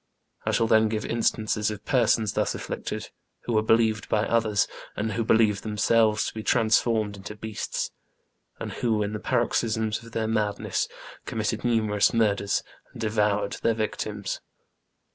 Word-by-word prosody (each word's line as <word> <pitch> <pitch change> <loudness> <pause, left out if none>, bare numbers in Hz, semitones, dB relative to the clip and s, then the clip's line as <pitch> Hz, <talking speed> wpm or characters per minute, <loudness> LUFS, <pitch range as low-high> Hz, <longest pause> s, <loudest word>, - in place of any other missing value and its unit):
I - - +3
shall 115 - +2
then 110 0 +4
give 110 0 -2
instances 110 -2 0
of 105 -1 -7
persons 115 -5 +2
thus - - 0
afflicted, - - -5 0.3
who 120 - -2
were 110 - +4
believed 110 -1 +2
by 105 0 +2
others, 110 -3 +2 0.3
and 110 +2 -1
who 115 - -1
believed 110 -2 +3
themselves, 110 0 +2
to - - -4
be 110 - -5
transformed 110 -2 +2
into 100 +2 -8
beasts, 110 0 -4 0.7
and - - -5
who, 110 -3 0
in 105 +1 -3
the 105 - -3
paroxysms 110 0 0
of 115 0 -14
their 110 -1 -1
madness, 110 -2 0 0.4
committed - - -2
numerous 110 -3 +2
murders, 100 -3 +2 0.3
and - - -11
devoured 105 -2 +1
their 115 - +2
victims. 105 -2 -3
110 Hz, 150 wpm, -26 LUFS, 105-115 Hz, 0.7 s, then